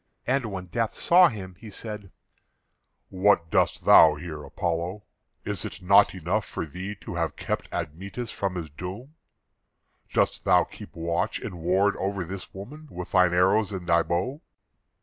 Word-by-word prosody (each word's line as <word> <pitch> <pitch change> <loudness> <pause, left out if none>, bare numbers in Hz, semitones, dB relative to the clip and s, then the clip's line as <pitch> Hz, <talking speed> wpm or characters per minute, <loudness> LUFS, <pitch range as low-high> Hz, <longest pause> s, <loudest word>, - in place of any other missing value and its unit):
And 130 -2 +1
when 95 -2 -5
Death 110 +5 -2
saw 180 +1 +6
him, 100 - -6
he 110 - -10
said: 105 -2 -7 1.0
"What 95 -3 +2
doest - - +1
thou - - +8
here, 75 -4 -7
Apollo? 85 +6 -3 0.4
Is - - -3
it - - -6
not 100 +2 +5
enough 90 +5 -1
for - - -5
thee 90 +7 -6
to - - -7
have 85 -3 -2
kept - - -4
Admetus 100 +9 -5
from 95 -2 -2
his 80 -4 -5
doom? 95 - -8 1.0
Dost - - +1
thou - - +5
keep - - -12
watch 85 +1 -1
and 90 - -7
ward 95 +4 +2
over 95 -1 -2
this 95 +2 -7
woman 145 +11 -10
with 90 -5 -7
thine 90 -1 +5
arrows 95 +4 +3
and 95 -3 -5
thy 85 -1 +4
bow?" 95 - -2
95 Hz, 160 wpm, -26 LUFS, 85-105 Hz, 1.0 s, thou